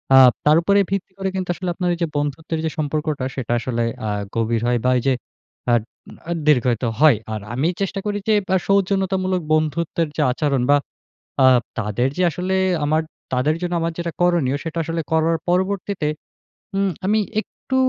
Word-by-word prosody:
আ - - +9 0.3
তার 150 +1 +6
উপরে 200 +4 +3
ভিত্তি 195 -1 -2
করে 195 0 -1
কিন্তু 185 -1 -3
আসলে 185 0 -4
আপনার 180 0 -1
ওই - - -3
যে - - +1
বন্ধুত্বের 150 +3 -2
যে - - +1
সম্পর্কটা 150 -2 -1
সেটা 125 -4 -4
আসলে 120 -1 -1 0.2
আ - - 0 0.3
গভীর 115 0 0
হয় 120 0 +2
বা 125 - +4
এই - - -4
যে 135 - +4 0.6
আ - - +5 0.6
আ - - -1 0.2
দীর্ঘায়িত 125 -6 +3 0.2
হয়। 150 -7 +6 0.2
আর 110 - -4
আমি 135 +6 +1
চেষ্টা 195 0 -1
করি 205 -1 -1
যে 215 - +5 0.2
আ - - +5
সৌজন্যতামূলক 190 -1 +1
বন্ধুত্বের 155 +1 0
যে - - +2
আচরণ 135 0 0
বা 145 - +7 0.7
আ - - +7 0.3
তাদের 105 +3 0
যে 185 - +2
আসলে 185 +4 -2 0.3
আমার 155 +2 +2 0.3
তাদের 135 +5 +2
জন্য 175 0 -2
আমার 165 0 -1
যেটা 170 -1 -3
করণীয় 170 -7 +2
সেটা 165 0 -5
আসলে 165 +1 -2
করার 160 +1 +2
পরবর্তীতে 190 -1 0 0.7
উম 195 0 +2 0.2
আমি 215 +3 +3 0.2
একটু 260 - -7
160 Hz, 180 wpm, -21 LUFS, 140-185 Hz, 0.7 s, আ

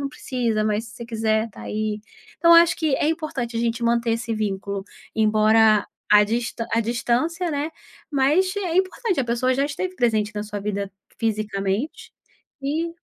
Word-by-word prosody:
não 280 - -2
precisa, 240 -4 -1
mas 215 +1 0
se 220 - -12
você 235 +1 -8
quiser, 220 -1 +1
está 225 - -12
aí." 215 0 -3 0.4
Então 335 -1 +7
eu 335 - +10
acho 340 - 0
que 315 -4 +1
é 295 - +1
importante 300 -8 -3
a - - 0
gente 235 0 -1
manter 235 0 +2
esse 230 0 -2
vínculo. 200 -2 -3 0.3
Embora 215 0 +4 0.3
a 210 0 +8
distan 230 +1 -2
a 230 - +3
distância, 245 - 0
né, 290 0 -1 0.4
mas 305 +7 +2
é 360 -4 -1
importante, 380 - 0
a - - 0
pessoa 240 +2 +1
já 275 +2 +1
esteve 365 +6 -4
presente 220 -5 +1
na 210 - -2
sua 210 -1 -5
vida 200 -1 -3 0.3
fisicamente, 215 +2 -2 0.5
e 315 +5 -1
235 Hz, 175 wpm, -23 LUFS, 215-285 Hz, 0.5 s, eu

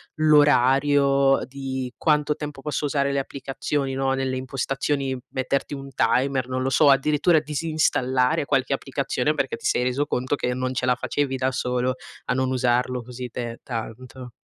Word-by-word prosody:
l'orario 140 -2 +4
di 130 -1 -5
quanto 150 -1 +2
tempo 150 -3 -7
posso 150 0 -2
usare 140 -1 0
le 140 - +1
applicazioni." 135 0 -3
No, 135 0 0
nelle 135 -1 -1
impostazioni, 135 +1 -2
metterti 135 +2 -2
un 135 -1 -7
timer, 130 0 +1
non 130 0 -2
lo 130 - 0
so, 145 +3 +3
o - - +7
addirittura 150 +4 +4
disinstallare 145 -4 0
qualche 135 -3 +1
applicazione - - -1
perché - - -1
ti - - -12
sei 125 - +2
reso 125 +3 0
conto 130 -1 -1
che 125 -2 -2
non 130 +1 -2
ce 125 0 -1
la 125 -1 +3
facevi 130 +2 -2
da 130 0 0
solo 125 0 -1 0.3
a - - 0
non 130 0 0
usarlo 125 0 +1
così 125 +1 -7
per 115 0 -5
tanto? 125 +2 -7
135 Hz, 165 wpm, -24 LUFS, 125-140 Hz, 0.3 s, o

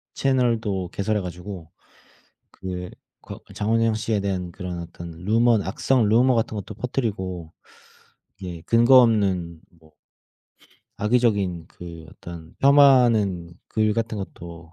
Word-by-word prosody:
채널도 115 -8 0
개설해 105 +1 -1
가지고 90 -1 -8 0.8
그 90 -1 -6 0.3
거 - - -10 0.2
장원영 115 +1 +1
씨에 110 -1 -1
대한 90 -3 -3
그런 90 -3 -6
어떤 85 0 -9
루먼 110 +6 +2
악성 110 +4 +1
루머 125 +4 +4
같은 110 -1 -1
것도 105 +1 -6
퍼트리고 95 -9 -3 0.9
이제 90 -4 -7
근거 120 +3 +6
없는 95 -8 +1 0.2
뭐 80 -1 -22 1.0
악의적인 100 -7 +1
그 85 -2 -11
어떤 85 -1 -11
폄하하는 120 -11 +4 0.2
글 110 -1 +1
같은 115 0 -2
것도 85 -3 -9
100 Hz, 240 characters per minute, -23 LUFS, 85-115 Hz, 1.0 s, 근거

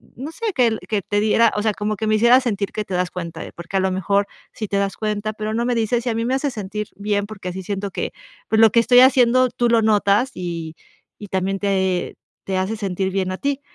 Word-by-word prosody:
no 275 +7 -6
sé, 460 +1 -2
que 230 -4 +2
que 210 -2 0
te 205 +2 -1
diera, 220 +1 +3
o 210 - +1
sea, 215 -1 +1
como 210 +1 -2
que 220 - -2
me 215 - +3
hicieras 240 +4 +5
sentir 200 -5 -2
que 215 - -2
te 190 - -7
das 180 0 0
cuenta, 170 -2 -6
porque 170 +3 -4
a - - +3
lo 190 - +1
mejor 200 +2 +1 0.3
sí 215 - -5
te 200 - -3
das 200 0 -1
cuenta, 215 0 -2
pero 215 0 -4
no 235 +2 0
me 245 0 0
dices, 230 +1 0
y - - 0
a - - 0
mí 230 +1 -1
me 255 +2 +1
hace 280 +1 -1
sentir 210 -2 -5
bien, 205 0 -1
porque 195 -4 -7
así 190 +1 -6
siento 200 +1 -3
que, - - -3 0.4
pues, 220 - +2
lo 225 - +8
que 235 - +5
estoy 245 +1 +5
haciendo 255 -1 +5
tú 240 0 0
lo 230 -1 +4
notas, 215 +3 +2
y 165 -3 -5 0.4
y 205 - -8
también 190 +1 -1
te 190 -3 0 0.3
te 190 -1 -1
hace 190 +4 -1
sentir 190 -2 -2
bien 185 -1 -1
a 185 - -4
ti", 280 0 -2
210 Hz, 255 wpm, -21 LUFS, 190-230 Hz, 0.4 s, lo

